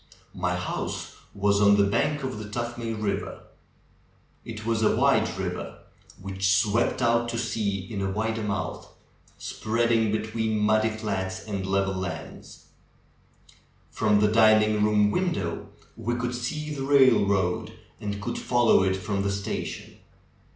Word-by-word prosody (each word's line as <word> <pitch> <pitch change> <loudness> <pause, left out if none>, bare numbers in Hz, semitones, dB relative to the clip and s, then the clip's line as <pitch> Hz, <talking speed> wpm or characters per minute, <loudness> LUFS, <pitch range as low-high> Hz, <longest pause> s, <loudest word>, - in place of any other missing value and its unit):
My 90 0 -1
house 90 - -4 0.2
was 100 0 +2
on 100 0 +6
the 100 - +5
bank 140 +9 0
of 130 -5 -4
the 110 - -6
Tuthmay 120 0 -4
River. 100 -2 -3 1.0
It 110 -2 -8
was 115 -1 0
a 110 - +3
wide - - +3
river, - - -4 0.4
which 95 0 0
swept 110 +5 +1
out 115 0 +2
to 115 - -3
sea 110 -4 -1
in 100 -2 -4
a 95 - -1
wider 110 +3 -2
mouth, 105 -2 -4 0.5
spreading 115 0 0
between 110 0 -1
muddy 110 +1 +3
flats 100 -4 -4
and 100 -3 -4
level 95 0 +1
lands. 95 -1 -7 1.2
From 105 -1 +2
the 105 0 +3
dining 110 -1 +4
room 105 -1 +3
window 170 - -2 0.3
we 115 +2 -2
could 125 0 -2
see 150 +5 -4
the 140 - -5
railroad 110 -10 +3 0.3
and 100 -1 -4
could 120 +3 -4
fol 120 -2 +1
low - - +6
it 95 0 +1
from 100 +1 -2
the 100 0 0
station. 100 -1 -5
110 Hz, 145 wpm, -26 LUFS, 100-115 Hz, 1.2 s, on